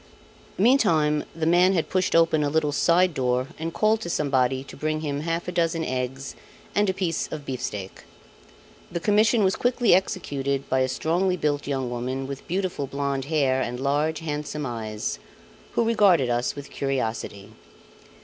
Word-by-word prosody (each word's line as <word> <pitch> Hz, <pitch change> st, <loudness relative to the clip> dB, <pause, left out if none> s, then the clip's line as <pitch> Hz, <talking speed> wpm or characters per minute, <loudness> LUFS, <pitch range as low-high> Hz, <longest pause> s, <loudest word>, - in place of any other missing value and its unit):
Meantime 170 Hz, -, +3 dB
the 165 Hz, -1 st, -2 dB
man 175 Hz, +3 st, +5 dB
had 165 Hz, -4 st, 0 dB
pushed 185 Hz, -2 st, +1 dB
open 165 Hz, -2 st, +4 dB
a 145 Hz, -, +1 dB
little 155 Hz, 0 st, +1 dB
side 175 Hz, +4 st, +3 dB
door 125 Hz, -1 st, 0 dB
and 165 Hz, +1 st, -3 dB
called 215 Hz, +4 st, +2 dB
to 170 Hz, -, -5 dB
somebody 130 Hz, -4 st, +1 dB
to 135 Hz, -, -12 dB
bring 155 Hz, +1 st, -2 dB
him 145 Hz, -2 st, -2 dB
half 165 Hz, +3 st, -2 dB
a -, -, -2 dB
dozen 165 Hz, -2 st, 0 dB
eggs 130 Hz, +1 st, -4 dB, 0.4 s
and 205 Hz, -1 st, +2 dB
a -, -, +1 dB
piece 175 Hz, -4 st, -1 dB
of 150 Hz, -2 st, -7 dB
beefsteak. 115 Hz, -7 st, -5 dB, 0.9 s
The 170 Hz, -, -2 dB
commission 215 Hz, +3 st, +3 dB
was 190 Hz, 0 st, +2 dB
quickly 245 Hz, -3 st, +2 dB
executed 140 Hz, -7 st, 0 dB
by 130 Hz, -, +1 dB
a 130 Hz, -, +2 dB
strongly 180 Hz, +7 st, 0 dB
built 145 Hz, -3 st, -1 dB
young 135 Hz, -3 st, -2 dB
woman 130 Hz, +2 st, -3 dB
with 140 Hz, 0 st, -7 dB
beautiful 180 Hz, -6 st, -2 dB
blonde 140 Hz, -1 st, -2 dB
hair 140 Hz, -4 st, +1 dB
and 125 Hz, 0 st, -3 dB
large, 145 Hz, +4 st, 0 dB
handsome 150 Hz, -1 st, -4 dB
eyes, 110 Hz, -3 st, -4 dB, 0.5 s
who -, -, +2 dB
regarded 195 Hz, -, +4 dB
us 120 Hz, +1 st, 0 dB
with 145 Hz, -1 st, -9 dB
curiosity. 110 Hz, -6 st, -3 dB
150 Hz, 165 wpm, -25 LUFS, 135-175 Hz, 0.9 s, man